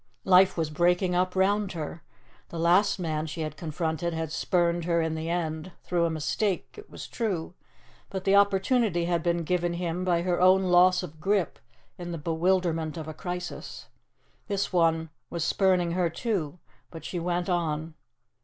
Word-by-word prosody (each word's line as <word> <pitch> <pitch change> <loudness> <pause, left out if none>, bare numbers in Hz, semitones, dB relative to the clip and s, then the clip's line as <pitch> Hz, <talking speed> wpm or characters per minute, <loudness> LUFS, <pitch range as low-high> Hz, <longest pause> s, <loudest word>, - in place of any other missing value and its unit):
Life 190 0 +5
was 160 -2 -1
breaking 175 +3 +2
up 180 +1 +1
round 195 +1 +1
her. 160 0 -6 0.5
The 170 - -7
last 180 +6 +3
man 160 -3 -2
she 155 +1 -5
had 155 -1 -4
confronted 165 +1 -3
had 160 -1 -3
spurned 170 +1 +1
her 170 -1 +2
in 160 -1 0
the 160 +1 -4
end 170 0 -3
through 175 -2 +1
a - - +1
mistake, 165 +5 -1
it 425 0 -12
was - - -8
true 190 -8 -3 0.6
but 190 -1 -4
the 195 0 +3
opportunity 200 -1 +3
had 170 -1 0
been 170 0 0
given 175 +1 0
him 175 0 -2
by 175 -2 +1
her 175 -1 0
own 185 +1 +6
loss 180 0 +4
of 160 -3 -9
grip 195 +2 0 0.4
in 175 0 -5
the 170 - -4
bewilderment 165 0 0
of 160 -1 -6
a 155 - -5
crisis. 180 +1 -6 0.6
This 200 -2 -2
one 165 -2 +2 0.2
was 170 -2 -3
spurning 180 -1 +2
her 175 -1 +1
too. 175 -4 -2 0.3
But 165 - -10
she 180 - -3
went 175 +1 -1
on. 160 -3 -1
175 Hz, 170 wpm, -27 LUFS, 160-185 Hz, 0.6 s, own